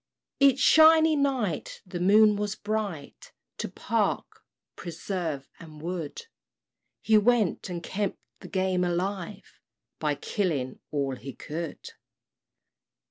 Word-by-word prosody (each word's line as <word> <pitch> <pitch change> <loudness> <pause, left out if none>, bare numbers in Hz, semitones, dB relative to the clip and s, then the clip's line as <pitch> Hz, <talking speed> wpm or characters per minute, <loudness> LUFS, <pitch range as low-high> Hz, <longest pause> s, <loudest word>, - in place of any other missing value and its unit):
Each 275 -2 +5
"shiny 315 +2 +6
night" 260 - -1
the 180 -1 -6
moon 210 +3 +5
was 205 0 -2
bright, 205 -9 -5 0.3
To - - -3
park, - - -2 0.3
preserve, 170 -4 -4
and 155 -2 -12
wood 170 - -5 0.8
He 220 -1 +5
went, 215 -4 +1
and 170 -1 -5
kept 200 +2 -2 0.2
the - - -10
game 185 -1 0
alive, 185 +3 -3 0.4
By - - 0
killing 155 - -2
all 140 -3 -2
he 135 +2 -8
could. 160 0 -6
185 Hz, 110 wpm, -27 LUFS, 165-215 Hz, 0.8 s, shiny